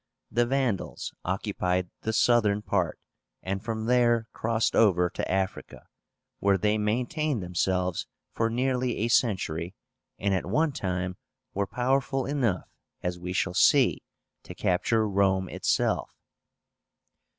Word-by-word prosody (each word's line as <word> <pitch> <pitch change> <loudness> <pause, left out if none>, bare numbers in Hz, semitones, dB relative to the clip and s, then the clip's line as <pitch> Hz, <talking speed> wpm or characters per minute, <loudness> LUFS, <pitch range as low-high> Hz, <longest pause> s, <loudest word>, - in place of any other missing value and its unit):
The 120 +1 +2
Vandals 130 -7 -1
occupied 90 -2 -1
the 110 - -1
southern 110 -3 +3
part, 90 -6 0 0.5
and 95 +2 -3
from 110 -1 -3
there 120 -1 +3
crossed 115 0 0
over 90 -5 +4
to - - -3
Africa, 95 0 -3 0.5
where 100 -1 +3
they 105 +3 +1
maintained 125 - -1
themselves 90 0 -1 0.3
for 115 0 +1
nearly 125 +1 0
a 115 +3 0
century, 95 -7 +1 0.4
and 100 0 0
at 95 -2 -1
one 150 - +2
time 95 -5 -3 0.4
were 100 0 -1
powerful 135 +3 0
enough, 125 -10 0 0.4
as 90 0 -2
we 90 +1 -5
shall 90 0 0
see, - - +4 0.4
to - - -10
capture 110 +5 +1
Rome 95 -1 +2
itself. - - 0
105 Hz, 125 wpm, -27 LUFS, 95-120 Hz, 0.5 s, over